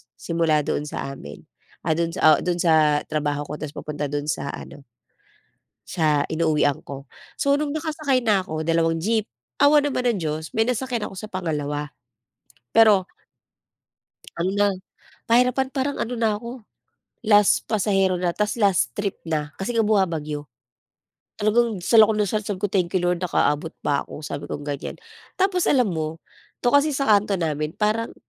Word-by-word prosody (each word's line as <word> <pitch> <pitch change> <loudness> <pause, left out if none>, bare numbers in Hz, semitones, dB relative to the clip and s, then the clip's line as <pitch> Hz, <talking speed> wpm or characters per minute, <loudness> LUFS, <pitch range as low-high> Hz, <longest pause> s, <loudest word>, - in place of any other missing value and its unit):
simula 165 -3 0
doon 150 - -2
sa 135 - -5
amin. 70 - -11 0.4
Ah, 160 - 0
do'n 170 +1 0
sa 155 -5 +5
o - - -6
do'n 175 -1 -1
sa 155 -3 +3
trabaho 145 -1 -2
ko, 150 - -7
tapos 155 -1 -7
papunta 150 -1 -4
do'n 145 +1 -3
sa 145 - -2
ano 145 - -11 1.0
sa 150 -4 +1
inuuwian 155 -2 +1
ko. 135 0 -9 0.3
So 280 0 +3
no'ng 290 0 -1
nakasakay 305 -3 0
na 210 -6 +2
ako, 155 -2 -5
dalawang 165 0 +2
jeep, 220 +4 +1 0.4
awa 295 +1 +7
naman 285 -3 -1
ng 210 - -3
Diyos 155 -1 -4
may 225 +1 +1
nasakyan 250 -2 -2
ako - - -11
sa 215 +3 -8
pangalawa. 150 -5 -3 0.8
Pero 210 -5 +6 1.3
ano 170 +2 0
na, 205 0 +3 0.6
pahirapan 250 +3 +3
parang 275 +1 -2
ano 245 - -2
na 225 -2 +1
ako, 235 0 -9 0.6
last 205 -2 +4
pasahero 195 -4 +1
na 175 -1 0
tapos 210 +4 -1
last 190 - +2
trip 200 -2 -3
na 150 -2 -2
kasi 195 +5 -3
nga 230 - +3
bumabagyo. 165 -8 0 0.9
Talagang 215 -1 +1
dasal 220 +4 +6
ako 220 - 0
ng 210 - +1
dasal, 210 +2 -1
sabi 195 -3 -4
ko, 205 - 0
"Thank 180 -3 0
you 185 - +2
Lord 175 0 +1
nakaabot 160 -3 0
pa 145 -1 0
ako." - - -9
sabi 145 -1 -5
kong 145 - -5
ganyan. 145 -1 -5 0.4
Tapos 370 -2 +1
alam 250 -7 +3
mo? 160 -1 -4 0.4
'To 245 - +3
kasi 285 +1 +4
sa 275 -2 -1
kanto 205 -1 +4
namin 155 -1 -2
parang 215 +2 -1
185 Hz, 170 wpm, -23 LUFS, 155-225 Hz, 1.3 s, awa